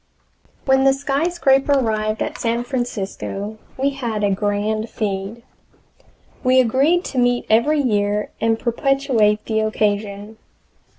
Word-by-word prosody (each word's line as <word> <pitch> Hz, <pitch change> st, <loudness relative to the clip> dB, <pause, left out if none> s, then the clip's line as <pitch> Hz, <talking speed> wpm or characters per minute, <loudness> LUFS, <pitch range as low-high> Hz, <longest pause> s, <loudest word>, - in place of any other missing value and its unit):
When 265 Hz, -1 st, +3 dB
the 270 Hz, 0 st, +5 dB
SKYSCRAPER 280 Hz, 0 st, +1 dB
arrived 215 Hz, -4 st, 0 dB
at -, -, -5 dB
San 235 Hz, +1 st, -1 dB
Francisco 215 Hz, -4 st, -4 dB, 0.2 s
we 275 Hz, +2 st, +1 dB
had 235 Hz, -6 st, -3 dB
a 200 Hz, -, +2 dB
grand 210 Hz, +2 st, -1 dB
"feed." 205 Hz, +2 st, -4 dB, 1.0 s
We 255 Hz, +1 st, +4 dB
agreed 275 Hz, +9 st, +2 dB
to 260 Hz, -, -2 dB
meet 245 Hz, 0 st, +1 dB
every 290 Hz, +8 st, +3 dB
year 210 Hz, -4 st, 0 dB
and 225 Hz, 0 st, +2 dB
perpetuate 235 Hz, -3 st, +1 dB
the 220 Hz, -1 st, 0 dB
occasion. 210 Hz, 0 st, -2 dB
230 Hz, 120 wpm, -20 LUFS, 210-270 Hz, 1.0 s, the